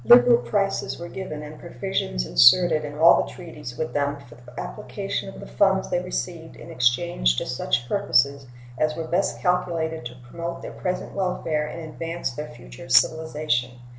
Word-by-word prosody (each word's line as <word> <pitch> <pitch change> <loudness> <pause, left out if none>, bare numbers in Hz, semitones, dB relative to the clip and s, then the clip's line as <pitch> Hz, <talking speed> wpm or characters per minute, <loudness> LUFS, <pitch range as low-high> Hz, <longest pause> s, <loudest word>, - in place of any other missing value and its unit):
Liberal 240 0 +7
prices 200 -2 -1
were 170 0 -7
given 155 -6 -6
and 150 0 -10
provisions 170 - -3
inserted 155 - +6
in 145 0 -6
all 165 +2 +7
the - - -8
treaties 150 -8 -9
with 160 - -3
them 145 0 0
for 130 -4 -15
the 125 +1 -12
application - - -5
of - - -12
the - - -8
funds 65 +1 +1
they - - +1
received - - -5
in - - -11
exchange 120 - +2
to - - -1
such 120 - -1
purposes 140 -8 +2 0.3
as 155 0 +1
were 165 - -3
best 180 +4 0
calculated 170 -4 0
to 120 - -12
promote 170 +5 -6
their - - -6
present 180 -1 -4
welfare 165 -5 -1
and 170 - -7
advance 165 +1 -4
their 150 +4 -6
future - - -12
civilization. 155 -6 +2
155 Hz, 170 wpm, -24 LUFS, 125-175 Hz, 0.3 s, Liberal